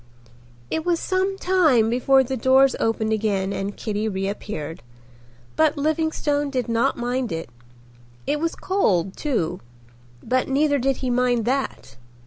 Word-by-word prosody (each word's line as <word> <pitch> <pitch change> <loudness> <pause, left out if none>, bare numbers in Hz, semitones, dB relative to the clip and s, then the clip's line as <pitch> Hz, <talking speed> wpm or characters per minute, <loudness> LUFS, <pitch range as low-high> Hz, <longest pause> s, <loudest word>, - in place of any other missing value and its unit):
It 320 - -1
was 345 -1 +1
some 380 +1 -1
time 320 - +3
before 265 +3 +3
the 265 +1 -3
doors 260 +2 +4
opened 220 -1 0
again 200 -3 0
and 200 +1 -4
Kitty 215 0 -2
reappeared, 190 - -4 0.7
but 315 -1 +2
Livingstone 295 -1 0
did 255 -3 -2
not 230 0 +1
mind 245 0 -2
it. 165 -6 -5 0.7
It 295 - 0
was 330 +1 -1
cold 195 - 0
too, 180 - -2 0.6
but 255 +2 0
neither 285 +1 +2
did 270 +1 0
he 250 - 0
mind 245 -2 +1
that. 255 - -3
250 Hz, 135 wpm, -23 LUFS, 215-290 Hz, 0.7 s, doors